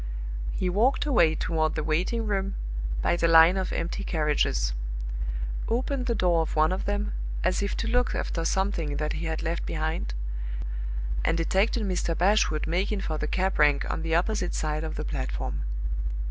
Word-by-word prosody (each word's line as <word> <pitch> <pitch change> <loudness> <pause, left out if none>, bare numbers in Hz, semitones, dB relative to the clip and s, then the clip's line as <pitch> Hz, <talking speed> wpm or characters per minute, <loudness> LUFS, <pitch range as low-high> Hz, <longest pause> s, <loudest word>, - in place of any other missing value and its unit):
He 185 - -1
walked 220 +12 +2
away 190 - +4
toward 155 -1 0
the 155 - -1
waiting 180 +9 0
room 195 -2 -1 0.5
by - - +3
the 170 -1 +2
line 165 +2 +8
of 190 -1 -1
empty 170 +4 -2
carriages; 150 - +1 0.9
opened 255 +2 0
the 235 - +1
door 175 -4 +3
of 160 - -3
one 155 +1 +4
of 185 - -2
them, 205 +1 -1 0.3
as 185 +2 +1
if 200 - -1
to 230 - -2
look 245 +1 +2
after 165 - -2
something 165 -5 0
that 150 0 -1
he 165 +1 -3
had 160 0 -2
left 165 +1 -1
behind, 155 - -2 1.1
and 165 - +2
detected 195 +7 +2
Mr. 180 -4 -1
Bashwood 180 -5 +3
making 190 +5 0
for 155 -4 -2
the 150 - -1
cab 190 +4 0
rank 145 -2 +4
on - - -3
the 165 0 0
opposite 180 +1 0
side 155 0 -1
of 160 -1 -4
the - - -3
platform. 65 +2 -3
170 Hz, 175 wpm, -27 LUFS, 155-200 Hz, 1.1 s, line